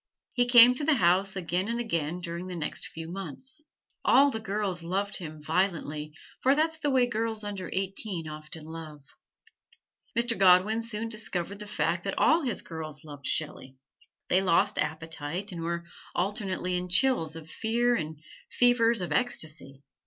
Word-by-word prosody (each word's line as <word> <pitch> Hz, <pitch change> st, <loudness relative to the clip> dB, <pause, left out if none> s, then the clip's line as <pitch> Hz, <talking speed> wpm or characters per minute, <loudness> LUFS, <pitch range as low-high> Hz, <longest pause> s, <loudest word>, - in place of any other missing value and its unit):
He 245 Hz, 0 st, +2 dB
came 245 Hz, 0 st, +9 dB
to 255 Hz, -, -5 dB
the 305 Hz, 0 st, +4 dB
house 190 Hz, -1 st, +3 dB
again 180 Hz, +1 st, -1 dB
and 235 Hz, +1 st, -1 dB
again 170 Hz, -7 st, -2 dB
during 170 Hz, +1 st, -5 dB
the 180 Hz, -, -5 dB
next 155 Hz, -3 st, -3 dB
few 165 Hz, 0 st, -8 dB
months. 195 Hz, -, -7 dB, 0.4 s
All 280 Hz, +1 st, +6 dB
the 225 Hz, -, -3 dB
girls 200 Hz, -4 st, -2 dB
loved 195 Hz, +4 st, -1 dB
him 155 Hz, -3 st, -8 dB
violently, 155 Hz, -3 st, -1 dB, 0.2 s
for 270 Hz, +2 st, +4 dB
that's 320 Hz, +1 st, +1 dB
the 290 Hz, -, 0 dB
way 260 Hz, -2 st, +4 dB
girls 225 Hz, -2 st, -2 dB
under 200 Hz, -3 st, -5 dB
eighteen 190 Hz, -3 st, -2 dB
often 155 Hz, +1 st, -8 dB
love. 155 Hz, -3 st, -9 dB, 1.1 s
Mr. 235 Hz, 0 st, +2 dB
Godwin 195 Hz, +4 st, +5 dB
soon 230 Hz, -1 st, -3 dB
discovered 200 Hz, -3 st, -2 dB
the 210 Hz, -, -8 dB
fact 175 Hz, -3 st, -1 dB
that 195 Hz, -, -2 dB
all 320 Hz, +2 st, +4 dB
his 245 Hz, -9 st, -2 dB
girls 155 Hz, -3 st, -5 dB
loved 145 Hz, -2 st, -8 dB
Shelley. 135 Hz, -4 st, -3 dB, 0.5 s
They 185 Hz, -, +3 dB
lost 180 Hz, -3 st, +2 dB
appetite, 160 Hz, +4 st, -3 dB
and 170 Hz, -2 st, -6 dB
were 170 Hz, +1 st, -3 dB, 0.3 s
alternately 185 Hz, -1 st, -1 dB
in 180 Hz, 0 st, -4 dB
chills 180 Hz, -, +2 dB
of 160 Hz, -1 st, -10 dB
fear 235 Hz, +2 st, +1 dB
and 155 Hz, -5 st, -4 dB, 0.3 s
fevers 235 Hz, -3 st, +3 dB
of 180 Hz, -, -4 dB
ecstacy. 155 Hz, -, -1 dB
185 Hz, 160 wpm, -28 LUFS, 165-230 Hz, 1.1 s, came